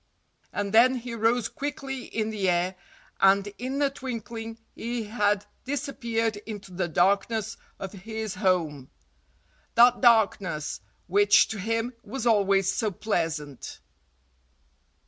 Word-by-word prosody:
And 205 0 -3
then 250 +4 +6
he 245 -1 -5
rose 230 +1 +2
quickly 270 -2 -5
in 220 0 -2
the 200 -3 0
air 175 +1 +1 0.5
and 195 +1 +5
in 260 +3 -3
a 280 - +2
twinkling 230 -4 -6 0.2
he 235 0 -3
had 205 -2 0 0.2
disappeared 235 -6 -2
into 205 -3 -9
the 175 0 -1
darkness 200 +5 +1 0.2
of 195 - -6
his 220 +1 -5
home—that 150 - 0
darkness 200 - +2 0.2
which 205 +3 +5
to 220 - -4
him 225 +4 -1
was 265 -1 -5
always 195 -4 +3
so 220 - 0
pleasant. 160 - -3
215 Hz, 115 wpm, -27 LUFS, 195-235 Hz, 0.5 s, then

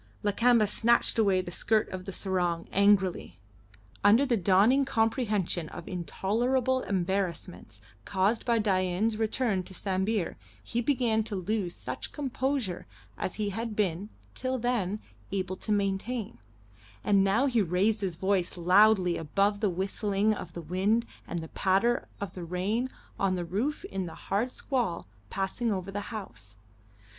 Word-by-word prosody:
Lakamba 230 +2 +4
snatched 230 +3 +3
away 195 -4 +4
the 175 -1 -7
skirt 215 +4 +1
of 185 -1 -6
the 195 - -5
sarong 180 -3 -1
angrily. 200 -2 +2 0.7
Under 220 +7 +6
the 250 -3 +2
dawning 205 +8 +4
comprehension 225 - 0
of - - -9
intolerable 240 - 0
embarrassments 180 - -3 0.2
caused 200 +4 +1
by 235 -2 +2
Dain's 200 +1 +1
return 220 -2 0
to 185 +1 -10
Sambir 190 0 -1 0.3
he 235 - -2
began 240 -4 +2
to 210 - -4
lose 190 -1 -2
such - - -6
composure 265 - -2 0.3
as 185 - -3
he 210 -1 -1
had 225 +2 -4
been, 200 -1 -1 0.2
till 260 0 -1
then, 225 -5 -1 0.3
able 190 -1 -2
to 215 - -3
maintain; 200 - -1 0.6
and 200 -1 +4
now 200 +7 +3
he 240 -5 +2
raised 200 +4 +1
his 185 -4 -1
voice 190 0 0
loudly 185 0 +5
above 200 +6 +1
the 210 -2 +2
whistling 200 +3 0
of - - -7
the 170 - -6
wind 195 +8 +1 0.2
and 175 - -4
the - - -7
patter 200 +6 +1
of 200 -3 -5 0.2
rain 210 +8 0 0.3
on 190 -1 +2
the 175 -1 -3
roof 225 - -2
in 190 -2 -4
the 165 - -8
hard 215 +6 -1
squall 245 -10 -2 0.2
passing 195 - -1
over 190 -1 -3
the 205 - -3
house. 110 - -8
200 Hz, 145 wpm, -29 LUFS, 185-225 Hz, 0.7 s, Under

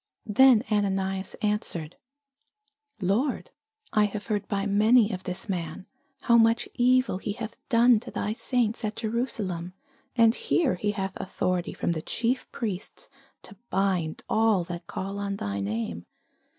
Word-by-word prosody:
Then 240 +1 +6
Ananias 195 -2 0
answered, 195 -6 -1 1.1
Lord, 220 +10 0 0.4
I 210 -1 +4
have 205 0 -4
heard 210 -3 -2
by 200 -1 -1
many 215 +2 +4
of 185 -2 -6
this 180 +2 -4
man, 170 -2 -4 0.4
how 235 -1 +5
much 225 +1 +3
evil 250 -5 +3
he 205 - -3
hath 225 0 -6
done 235 -2 +5
to - - -10
thy 210 - -2
saints 235 -1 -1
at 215 0 -2
Jerusalem: 215 -7 -2 0.4
and 230 -2 +5
here 305 +1 +1
he 205 +3 -1
hath 195 -1 -3
authority 185 -1 -2
from - - -1
the 160 -2 -2
chief 240 +9 -1
priests 205 -5 -5 0.3
to - - -11
bind 185 -5 0
all 220 -4 +3
that 175 0 -7
call 195 +1 -4
on 200 -1 -2
thy 100 - -3
name. 100 -4 -3
205 Hz, 145 wpm, -27 LUFS, 185-230 Hz, 1.1 s, Then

